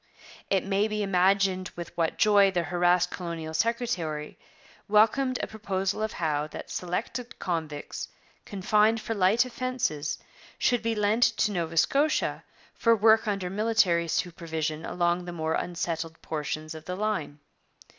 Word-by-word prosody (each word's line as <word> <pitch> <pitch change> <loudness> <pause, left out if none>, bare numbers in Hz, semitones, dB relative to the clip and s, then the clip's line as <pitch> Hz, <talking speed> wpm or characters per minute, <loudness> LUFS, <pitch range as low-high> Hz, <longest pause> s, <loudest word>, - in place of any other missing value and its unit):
It 195 -1 +1
may 200 +2 +1
be 210 -1 -2
imagined 190 0 +2
with 175 -1 -8
what 165 -1 0
joy 205 -2 +5
the 180 -3 0
harassed 175 +1 +2
colonial 165 -3 -5
secretary 180 -8 -2 0.5
welcomed 225 +5 +3
a - - -1
proposal 195 -1 -2
of 220 0 -2
Howe 150 -3 -1
that - - -9
selected 230 +8 -4
convicts, 160 -5 -4 0.4
confined 210 +3 +2
for 220 +1 -3
light 210 +4 +3
offences, 245 - -2 0.4
should 245 -2 +2
be 230 -1 -1
lent 210 +2 +1
to 220 -3 +3
Nova 165 -3 -3
Scotia 285 - +2 0.3
for 230 -1 +3
work 220 +1 +4
under 195 -3 -1
military 195 -5 +2
supervision 160 -3 -2
along 175 0 0
the 175 - -5
more 160 -2 -2
unsettled 165 -2 -3
portions 155 0 -4
of 160 -1 -10
the 180 - -4
line. 195 -8 -2
185 Hz, 140 wpm, -27 LUFS, 165-215 Hz, 0.5 s, joy